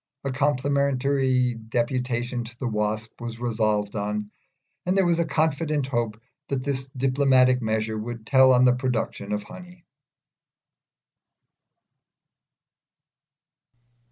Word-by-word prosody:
A 135 Hz, -, -2 dB
complimentary 135 Hz, -2 st, +1 dB
deputation 120 Hz, +2 st, -2 dB
to 115 Hz, +1 st, -11 dB
the 130 Hz, -, -3 dB
Wasp 110 Hz, +1 st, -2 dB
was 115 Hz, -1 st, -6 dB
resolved 110 Hz, -3 st, 0 dB
on, 105 Hz, 0 st, -3 dB, 0.5 s
and 185 Hz, +2 st, 0 dB
there 190 Hz, -, +4 dB
was 170 Hz, -1 st, +2 dB
a 170 Hz, -, +2 dB
confident 155 Hz, -1 st, 0 dB
hope 120 Hz, -5 st, -2 dB, 0.3 s
that 135 Hz, -2 st, -2 dB
this 135 Hz, -1 st, -2 dB
diplomatic 130 Hz, -1 st, +3 dB
measure 110 Hz, 0 st, -1 dB
would 115 Hz, 0 st, -6 dB
tell 130 Hz, 0 st, +6 dB
on 125 Hz, 0 st, +5 dB
the 125 Hz, -, +6 dB
production 125 Hz, -5 st, -2 dB
of 105 Hz, 0 st, -1 dB
honey. 180 Hz, +6 st, -13 dB
125 Hz, 110 wpm, -25 LUFS, 115-140 Hz, 0.5 s, tell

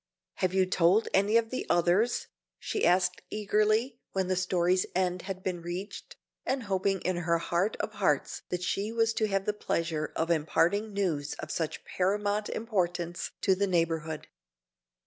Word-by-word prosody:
"Have 185 Hz, -, +1 dB
you 190 Hz, -1 st, +4 dB
told 185 Hz, +3 st, +3 dB
any 200 Hz, +4 st, +4 dB
of 225 Hz, -1 st, 0 dB
the 255 Hz, -, -2 dB
others?" 180 Hz, +8 st, +2 dB, 0.3 s
she 420 Hz, -, 0 dB
asked 180 Hz, 0 st, +2 dB
eagerly, 215 Hz, +4 st, +1 dB
when 190 Hz, -1 st, 0 dB
the 185 Hz, -, +2 dB
story's 185 Hz, 0 st, +2 dB
end 180 Hz, -1 st, +1 dB
had 190 Hz, -1 st, -5 dB
been 180 Hz, -2 st, -2 dB
reached, 175 Hz, +4 st, -6 dB, 0.3 s
and 265 Hz, -1 st, -1 dB
hoping 195 Hz, -2 st, 0 dB
in 185 Hz, -1 st, -1 dB
her 170 Hz, -1 st, +1 dB
heart 175 Hz, +5 st, 0 dB
of -, -, -2 dB
hearts -, -, 0 dB
that 180 Hz, 0 st, -2 dB
she 200 Hz, +4 st, -1 dB
was 225 Hz, 0 st, +2 dB
to 220 Hz, -1 st, +1 dB
have 195 Hz, -1 st, 0 dB
the 210 Hz, -, +1 dB
pleasure 165 Hz, -6 st, -2 dB
of 165 Hz, +1 st, 0 dB
imparting 175 Hz, +6 st, +2 dB
news 165 Hz, -8 st, -1 dB
of 155 Hz, -, -7 dB
such 160 Hz, -2 st, -3 dB
paramount 205 Hz, +2 st, 0 dB
importance 175 Hz, -6 st, -2 dB
to 190 Hz, -, +4 dB
the 200 Hz, +2 st, +1 dB
neighborhood. 165 Hz, -3 st, 0 dB
185 Hz, 165 wpm, -29 LUFS, 175-210 Hz, 0.3 s, you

